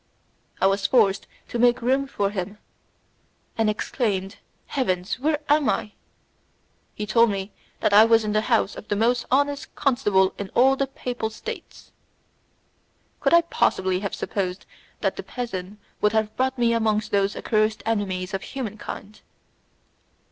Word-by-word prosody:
I - - +2
was 195 +1 +2
forced 205 -6 +3 0.2
to 240 - -3
make 245 0 +4
room 265 +3 +1
for 200 -6 -1
him, 205 +1 -4 1.0
and 225 -1 +2
exclaimed 210 -3 -2 0.3
"Heavens, 185 -7 -1
where 300 +2 +1
am 295 -4 +3
I?" 210 +1 -1 1.0
He 210 - -3
told 230 +2 +4
me 195 0 -3 0.3
that 205 - +2
I 210 +2 +9
was 225 -1 +4
in 210 - -1
the 215 - +3
house 220 -3 +1
of 215 - -10
the 205 - 0
most 240 +3 +1
honest 285 +1 0
constable 210 -9 +2
in 200 -1 -4
all 265 +2 +5
the 275 0 -1
papal 245 -4 -4
states. 460 - -9 1.3
Could - - +4
I 340 - +7
possibly 190 - +1
have 200 0 -3
supposed 185 -2 -3 0.4
that - - 0
the - - -3
peasant 205 -5 -5 0.2
would 210 0 +3
have 220 -1 0
brought 260 +1 0
me 235 -1 +3
amongst 215 -2 0
those 200 0 +1
accursed 215 -1 0
enemies 195 -4 -1
of 195 - -2
humankind! 215 -4 -7
215 Hz, 150 wpm, -24 LUFS, 200-245 Hz, 1.3 s, I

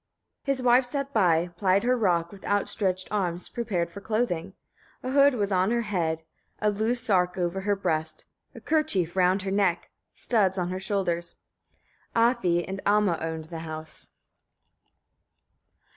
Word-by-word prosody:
16. 275 - +2
His 260 - -6
wife 245 +2 +6
sat 275 +2 -3
by, 175 -5 +3
plied 190 +2 +2
her 250 +1 +3
rock, 175 -7 +1
with 200 - -13
outstretched 195 -2 0
arms, 180 -4 -1
prepared 185 -8 -2
for 200 - -9
clothing. 200 -5 -1 0.5
A 255 - -3
hood 280 0 +5
was 205 -3 -1
on 185 +1 +2
her 235 0 +1
head, 165 -6 -1 0.3
a 210 -1 +1
loose 220 +4 0
sark 180 -6 +2
over 180 +1 -1
her 205 +1 +1
breast, 160 -5 -2 0.3
a - - -8
kerchief 200 - +1
round 185 +1 +3
her 195 - -3
neck, 195 -4 +1 0.2
studs 200 -5 +1
on 180 -1 -1
her 185 - -3
shoulders. 180 -4 -2 0.8
Afi 230 -8 +2
and 195 0 -5
Amma 205 -4 +2
owned 160 -1 -4
the 165 - -5
house. 155 -1 -6
195 Hz, 155 wpm, -27 LUFS, 175-220 Hz, 0.8 s, wife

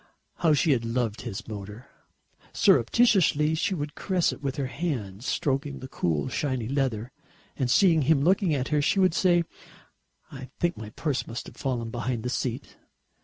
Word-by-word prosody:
How 160 -3 +3
she 150 +2 +2
had 120 -4 +2
loved 115 -2 -2
his 95 - -6
motor! 105 +2 -8 0.7
Surreptitiously 160 - +4
she 170 +4 0
would 145 -2 -4
caress 185 0 0
it - - -11
with 135 -2 -2
her 140 - -2
hand, 120 - -4
stroking 140 +1 -1
the 130 - -8
cool 80 - -1
shiny 130 -6 -2
leather, 130 -3 -1 0.4
and 130 -2 -1
seeing 165 +4 +5
him 140 0 +3
looking 180 -1 +3
at 130 -2 -2
her, 150 -1 +2
she 175 +7 +2
would 185 -3 +4
say, 175 -1 +3 0.9
"I 135 -1 -9
think 175 0 +1
my 110 -1 -8
purse 140 +4 -2
must 115 +1 -6
have - - -12
fallen 120 -4 -2
behind 120 -1 -3
the 125 - -2
seat." 125 +1 -4
135 Hz, 170 wpm, -26 LUFS, 120-160 Hz, 0.9 s, seeing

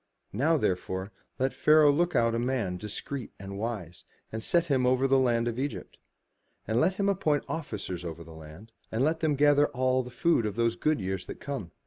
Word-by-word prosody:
Now, 155 +10 +2
therefore, 95 -3 -2 0.3
let 130 +1 0
Pharaoh 150 -1 +5
look 175 +4 +1
out 115 0 +3
a 115 - 0
man 120 -7 -1
discreet 105 +6 -5
and 100 0 -7
wise, 100 -7 -5 0.3
and 110 - -4
set 170 +8 +2
him 130 -5 +2
over 130 +1 +3
the 135 0 +4
land 120 -2 +2
of 120 +1 -2
Egypt. 140 +1 -5 0.7
And 110 +2 +1
let 185 +6 +2
him 200 0 0
appoint 160 -7 +1
officers 105 - -4
over 85 -1 -6
the 80 - -13
land, 80 +8 -12 0.2
and 115 +4 0
let 160 +3 +1
them 155 -3 +1
gather 145 +1 +4
all 130 -1 +1
the 125 - -8
food 125 -2 +1
of 105 - -4
those 115 0 +1
good 155 -3 +1
years 95 -1 -4
that - - -8
come. 135 -11 -5
125 Hz, 200 wpm, -28 LUFS, 105-145 Hz, 0.7 s, Pharaoh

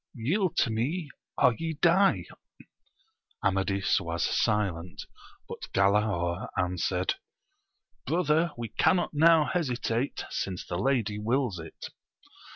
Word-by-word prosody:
Yield 165 - 0
to 115 - +2
me, 145 +8 -2 0.3
or 125 - +5
ye 165 -1 -2
die! 175 +5 +3 1.2
Amadis 95 0 +1
was 85 -2 -2
silent; 90 -5 -1 0.4
but - - -8
Galaor 95 -3 +1
answered. 90 0 0 0.9
Brother, 165 +1 +2
we 120 -1 -5
cannot 180 -3 +2
now 160 +1 +5
hesitate, 125 -6 -1
since 95 -2 -3
the 85 - -4
lady 110 -3 0
wills 115 -3 0
it. 80 -1 -9
115 Hz, 105 wpm, -28 LUFS, 95-155 Hz, 1.2 s, or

